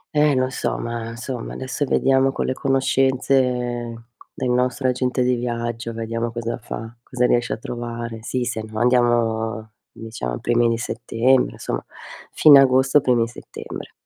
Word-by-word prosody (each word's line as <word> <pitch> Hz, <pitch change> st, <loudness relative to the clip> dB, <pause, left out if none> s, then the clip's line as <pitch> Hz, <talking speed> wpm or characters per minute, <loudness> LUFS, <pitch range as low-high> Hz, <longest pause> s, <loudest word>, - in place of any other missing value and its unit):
Eh, 150 Hz, -2 st, +4 dB
lo 130 Hz, 0 st, +2 dB
so, -, -, -2 dB
ma 115 Hz, -1 st, -4 dB
insomma 120 Hz, +1 st, -6 dB
adesso 130 Hz, +2 st, -3 dB
vediamo 135 Hz, 0 st, +3 dB
con -, -, -2 dB
le 130 Hz, -, 0 dB
conoscenze 135 Hz, 0 st, +2 dB, 0.9 s
del 125 Hz, -, -3 dB
nostro 125 Hz, +1 st, +1 dB
agente 125 Hz, 0 st, 0 dB
di 125 Hz, -, +2 dB
viaggio, 120 Hz, -1 st, -3 dB
vediamo 115 Hz, +1 st, -3 dB
cosa 115 Hz, 0 st, -3 dB
fa, 115 Hz, +2 st, -7 dB
cosa 125 Hz, 0 st, -1 dB
riesce 120 Hz, 0 st, +1 dB
a -, -, -4 dB
trovare. 115 Hz, 0 st, -6 dB
Sì, 125 Hz, +2 st, -2 dB
se 115 Hz, -2 st, -3 dB
no 110 Hz, 0 st, -8 dB
andiamo 115 Hz, -2 st, +1 dB, 0.2 s
diciamo 110 Hz, -, -5 dB
i -, -, -7 dB
primi 120 Hz, 0 st, +2 dB
di 115 Hz, -, 0 dB
settembre, 120 Hz, +2 st, +1 dB
insomma -, -, -4 dB, 0.5 s
fine 145 Hz, -3 st, +8 dB
agosto 130 Hz, +2 st, +4 dB
primi 120 Hz, -4 st, +2 dB
settembre. 120 Hz, -, -9 dB
120 Hz, 155 wpm, -22 LUFS, 115-130 Hz, 0.9 s, fine